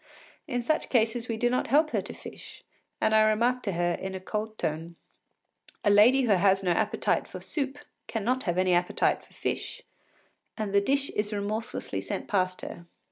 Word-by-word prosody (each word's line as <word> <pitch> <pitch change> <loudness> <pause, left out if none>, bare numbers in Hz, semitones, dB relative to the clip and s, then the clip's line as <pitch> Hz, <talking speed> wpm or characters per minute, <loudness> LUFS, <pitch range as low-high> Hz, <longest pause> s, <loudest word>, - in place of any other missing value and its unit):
In 245 -4 -2
such 310 +6 0
cases 230 0 +1
we 225 - -2
do 240 +2 +2
not 250 +1 0
help 305 +3 +3
her - - +1
to - - -8
fish, - - -11 0.4
and 220 - +2
I 220 - +6
remark 235 +4 +2
to 200 -5 -2
her, 175 0 +1
in 190 +1 -5
a - - -4
cold 215 +3 -4
tone, 165 +2 -3 0.9
“A 205 - +4
lady 240 +7 +6
who 235 - +2
has 195 0 +4
no 180 - +2
appetite 170 - +1
for - - -8
soup 280 -2 -3 0.3
cannot 240 +4 -1
have 175 -2 0
any 185 -1 +3
appetite 175 0 +1
for - - -22
fish,” - - -4 0.7
and 210 -3 -3
the 200 - +5
dish 275 +6 +1
is 210 0 -2
remorselessly 210 +2 -3
sent - - -4
past 185 -2 0
her. 170 - -8
215 Hz, 190 wpm, -28 LUFS, 190-245 Hz, 0.9 s, I